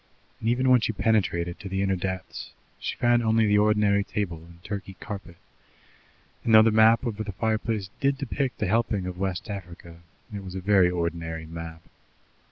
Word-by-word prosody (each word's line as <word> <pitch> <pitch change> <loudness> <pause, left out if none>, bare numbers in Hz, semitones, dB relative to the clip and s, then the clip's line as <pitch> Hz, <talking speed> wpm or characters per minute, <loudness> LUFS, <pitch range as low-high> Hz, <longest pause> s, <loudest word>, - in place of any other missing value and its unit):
And 115 - -1
even 125 +2 +1
when 125 -2 +6
she 110 - 0
penetrated 90 -6 0
to 100 - -7
the 95 +1 -1
inner 95 -1 +1
depths, 95 0 -5 0.3
she - - -3
found 120 0 +3
only 110 -1 +3
the 105 0 +4
ordinary 105 -1 +3
table 100 -5 -3
and 85 +1 -15
Turkey 100 -2 -6
carpet, 100 -5 -8 1.1
and 115 - +4
though 110 - +9
the 115 - +4
map 110 +2 +5
over 110 -2 -3
the 100 -2 -6
fireplace 110 -1 -1
did 140 0 +1
depict 140 -1 -2
a - - +2
helping 105 -1 +1
of 90 -1 -6
West 95 -2 -2
Africa, 85 -4 -8 0.3
it 100 -1 -5
was 95 -1 -8
a - - -2
very 95 -1 +4
ordinary 85 -2 -3
map. 80 0 -8
100 Hz, 180 wpm, -26 LUFS, 90-110 Hz, 1.1 s, though